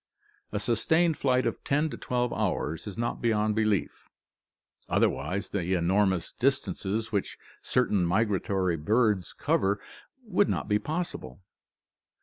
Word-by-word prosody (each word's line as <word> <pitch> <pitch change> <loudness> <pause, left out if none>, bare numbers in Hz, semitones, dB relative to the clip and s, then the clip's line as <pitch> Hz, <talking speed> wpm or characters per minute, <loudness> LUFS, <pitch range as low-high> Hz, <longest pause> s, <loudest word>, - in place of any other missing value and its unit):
A 105 - -2
sustained 160 +10 +2
flight 130 -2 +1
of - - -2
ten 150 +2 +1
to - - -5
twelve 125 -1 -1
hours 85 -4 -2
is 100 - -7
not 120 +1 -2
beyond 110 -2 +2
belief, 110 -2 -1 0.8
otherwise 95 +1 0
the 95 -2 0
enormous 95 +1 +1
distances 115 -5 -1
which 100 -3 -2 0.2
certain 105 -7 +1
migratory 95 -2 +1
birds 105 +3 +1
cover 100 +1 +1 0.5
would 205 -1 +2
not - - -1
be 105 -1 +2
possible. 130 - -5
105 Hz, 125 wpm, -28 LUFS, 95-125 Hz, 0.8 s, sustained